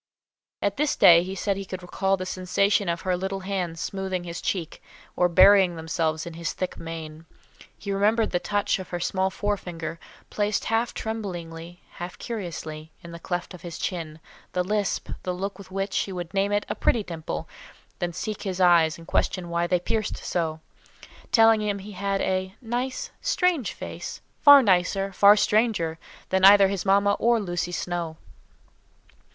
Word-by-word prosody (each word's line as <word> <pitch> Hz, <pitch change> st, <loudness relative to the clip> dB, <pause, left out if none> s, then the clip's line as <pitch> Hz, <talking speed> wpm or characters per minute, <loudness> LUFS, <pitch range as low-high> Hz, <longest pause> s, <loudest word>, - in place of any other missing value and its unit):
At 200 Hz, 0 st, 0 dB
this 295 Hz, +1 st, +1 dB
day 170 Hz, -1 st, +8 dB
he 190 Hz, +2 st, -5 dB
said 195 Hz, +1 st, -1 dB
he 195 Hz, -, -4 dB
could 185 Hz, -1 st, -7 dB
recall 195 Hz, +2 st, 0 dB
the 185 Hz, -, -5 dB
sensation 190 Hz, +1 st, +1 dB
of 170 Hz, 0 st, -2 dB
her 185 Hz, -1 st, 0 dB
little 190 Hz, +2 st, -3 dB
hands 185 Hz, -4 st, -3 dB
smoothing 190 Hz, -2 st, -3 dB
his 170 Hz, -1 st, -6 dB
cheek, 170 Hz, -4 st, -3 dB, 0.3 s
or 180 Hz, -, +3 dB
burying 190 Hz, 0 st, +6 dB
themselves 160 Hz, -1 st, -2 dB
in 170 Hz, -, -7 dB
his 170 Hz, -1 st, -4 dB
thick 185 Hz, -, -4 dB
mane. 160 Hz, -1 st, -8 dB, 0.5 s
He 200 Hz, -, -5 dB
remembered 215 Hz, +3 st, +2 dB
the 175 Hz, -, +1 dB
touch 205 Hz, +1 st, 0 dB
of 185 Hz, -, -8 dB
her 175 Hz, -, -3 dB
small 190 Hz, +2 st, 0 dB
forefinger, 175 Hz, -6 st, -4 dB, 0.3 s
placed 205 Hz, 0 st, 0 dB
half 225 Hz, +1 st, 0 dB
tremblingly, 175 Hz, -6 st, -6 dB
half 175 Hz, 0 st, -6 dB
curiously, 160 Hz, -8 st, -6 dB
in 170 Hz, -, -9 dB
the 170 Hz, -, -8 dB
cleft 175 Hz, +2 st, -4 dB
in 180 Hz, -, -10 dB
his 170 Hz, -1 st, -8 dB
chin, 160 Hz, -4 st, -4 dB, 0.3 s
the 180 Hz, -, +1 dB
lisp, 205 Hz, +1 st, -1 dB
the 180 Hz, -1 st, -3 dB
look 195 Hz, +3 st, -5 dB
with 195 Hz, -, -11 dB
which 195 Hz, +1 st, -3 dB
she 195 Hz, -, -1 dB
would 175 Hz, -1 st, -6 dB
name 200 Hz, +1 st, +1 dB
it 205 Hz, 0 st, +1 dB
"a -, -, -2 dB
pretty 225 Hz, -, +1 dB
dimple," 165 Hz, -4 st, -5 dB, 0.5 s
then 175 Hz, -1 st, -1 dB
seek 210 Hz, +5 st, -5 dB
his 190 Hz, -3 st, -4 dB
eyes 170 Hz, -3 st, +5 dB
and 165 Hz, -, -13 dB
question 175 Hz, +1 st, -1 dB
why 170 Hz, 0 st, 0 dB
they 180 Hz, 0 st, +2 dB
pierced 215 Hz, +4 st, -2 dB
so, 160 Hz, -2 st, -2 dB, 0.7 s
telling 225 Hz, -1 st, +6 dB
him 205 Hz, -1 st, -1 dB
he 200 Hz, +2 st, -9 dB
had 195 Hz, 0 st, -2 dB
a 190 Hz, 0 st, -1 dB
"nice, 250 Hz, +2 st, -3 dB
strange 360 Hz, -, +1 dB
face; -, -, -7 dB, 0.2 s
far 285 Hz, -2 st, +9 dB
nicer, 195 Hz, 0 st, +1 dB
far 200 Hz, +2 st, +7 dB
stranger, 210 Hz, -7 st, +1 dB, 0.3 s
than 190 Hz, 0 st, +1 dB
either 195 Hz, 0 st, +8 dB
his 195 Hz, -1 st, -3 dB
mamma 200 Hz, +1 st, +4 dB
or 235 Hz, 0 st, +3 dB
Lucy 175 Hz, -3 st, -3 dB
Snowe." 175 Hz, -2 st, -3 dB
185 Hz, 175 wpm, -25 LUFS, 170-205 Hz, 0.7 s, far